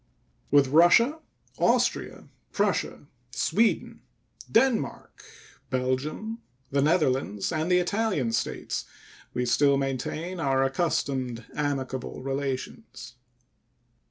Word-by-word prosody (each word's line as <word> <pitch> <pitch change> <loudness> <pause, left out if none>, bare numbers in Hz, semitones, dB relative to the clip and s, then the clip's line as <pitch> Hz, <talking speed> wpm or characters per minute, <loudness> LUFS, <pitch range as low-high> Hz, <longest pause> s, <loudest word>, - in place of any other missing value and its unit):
With 140 -2 +4
Russia, 175 - +5 0.4
Austria, - - +1 0.3
Prussia, 200 -7 -1 0.2
Sweden, 210 - 0 0.5
Denmark, 230 - 0 0.5
Belgium, 130 - -2 0.3
the 140 0 +2
Netherlands, 135 - +1
and 160 +2 -1
the 180 - +5
Italian 180 - 0
States 110 -1 -2 0.5
we 125 - 0
still 140 +3 +3
maintain 140 +7 -3
our 135 -3 +2
accustomed 135 -5 -1
amicable 135 -4 -3
relations. 135 - -5
140 Hz, 85 wpm, -27 LUFS, 130-180 Hz, 0.5 s, Russia